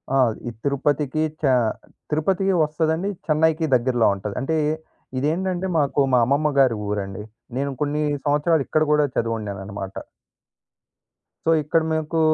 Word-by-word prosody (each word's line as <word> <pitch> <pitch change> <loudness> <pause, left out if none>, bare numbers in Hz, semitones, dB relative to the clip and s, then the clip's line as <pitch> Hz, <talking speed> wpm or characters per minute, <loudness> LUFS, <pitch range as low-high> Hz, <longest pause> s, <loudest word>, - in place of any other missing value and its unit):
ఆ! - - +4 0.3
ఈ - - -1
తిరుపతికి 145 +2 0 0.2
చె 140 -4 +3 0.6
తిరుపతికి 190 +5 +1
వస్తదండి 160 +5 0 0.2
చెన్నైకి 160 +1 +2
దగ్గరలో 120 -1 +2
ఉంటది. 100 +1 -6
అంటే 160 +5 -1 0.6
ఇదేంటంటే, 180 +6 -1
మాకు 145 -1 +1
మా 125 - +6
అమ్మమ్మ 145 +4 +2
గారి 130 -4 +4
ఊరండి. 100 0 -3 0.3
నేను 140 +1 -1
కొన్ని 150 +1 0 0.2
సంవత్సరాలు 150 +1 +2
ఇక్కడ 155 0 +2
కూడా 150 -1 +4
చదివున్నాననమాట. 100 -4 -3 1.5
సో 165 - +4
ఇక్కడ 160 +3 +2
మీకు 160 +1 -1
145 Hz, 120 wpm, -23 LUFS, 125-160 Hz, 1.5 s, మా